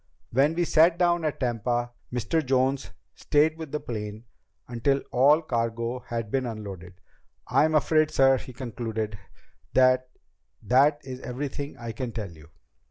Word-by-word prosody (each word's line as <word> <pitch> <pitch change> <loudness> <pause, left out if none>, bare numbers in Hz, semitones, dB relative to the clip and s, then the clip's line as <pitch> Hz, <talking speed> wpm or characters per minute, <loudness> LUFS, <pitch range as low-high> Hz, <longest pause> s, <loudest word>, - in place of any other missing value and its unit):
When 140 +6 +3
we 175 - +1
sat 165 +1 +4
down 175 -1 +2
at 150 - -2
Tampa, 120 0 -1 0.2
Mr. 125 +7 0
Jones 130 -5 +1 0.2
stayed 155 +2 +2
with 160 -3 -7
the 150 - -2
plane 105 -3 -6 0.4
until 135 +3 0
all 145 +6 +5
cargo 115 -2 -2
had 115 -3 -5
been 130 -2 0
unloaded. 100 -5 -7 0.5
I'm 155 +1 +3
afraid, 155 0 +3
sir," 135 -1 +4
he - - -10
concluded, 110 -4 -4 0.5
"that 130 0 +4 0.5
that 145 +4 +4
is 130 -1 -7
everything 140 +3 -5
I 115 -1 -6
can 115 +1 -5
tell 105 -6 -5
you." 80 -2 -16
130 Hz, 145 wpm, -26 LUFS, 115-145 Hz, 0.5 s, all